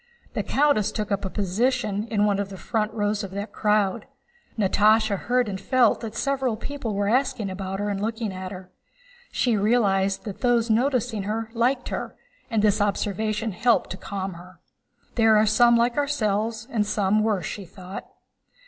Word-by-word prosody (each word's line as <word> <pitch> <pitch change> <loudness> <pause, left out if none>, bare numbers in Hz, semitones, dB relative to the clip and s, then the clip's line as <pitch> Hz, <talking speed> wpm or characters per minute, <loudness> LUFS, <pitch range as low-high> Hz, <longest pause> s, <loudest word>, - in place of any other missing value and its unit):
The - - -1
countess 270 -8 +2
took 210 -2 -3
up 200 0 0
a - - -2
position 210 +2 0
in 210 -3 +1
one 200 -1 +1
of 200 -1 -2
the 195 - -8
front 215 +1 -1
rows 210 -1 -1
of 195 - -5
that 200 +1 -5
crowd. 210 0 +1 0.5
Natásha 215 +1 +3
heard 245 +4 0
and 190 -1 -4
felt 250 +1 +3
that 225 -1 -6
several 265 -4 0
people 235 -3 -4
were 200 0 0
asking 225 -4 +1
about 190 0 -4
her 205 - -1
and 200 -1 -2
looking 220 -1 -2
at 185 0 -6
her. 185 -1 -10 0.6
She 240 -3 +1
realized 200 -2 +2
that 205 -3 -7
those 240 -2 +2
noticing 245 -2 +1
her 220 +3 -3
liked 245 +3 +1
her, - - -4 0.3
and 220 -4 +1
this 210 -1 +3
observation 215 +2 -1
helped 230 +5 +2
to 185 - -5
calm 195 -1 -5
her. 175 0 -13 0.5
"There 225 -2 +5
are 215 - +4
some 235 +2 +5
like 235 +2 +1
ourselves 225 -5 0
and 220 -3 +1
some 210 0 +1
worse," 205 -6 0
she 200 +4 -5
thought. 185 +2 -9
215 Hz, 175 wpm, -24 LUFS, 200-230 Hz, 0.6 s, There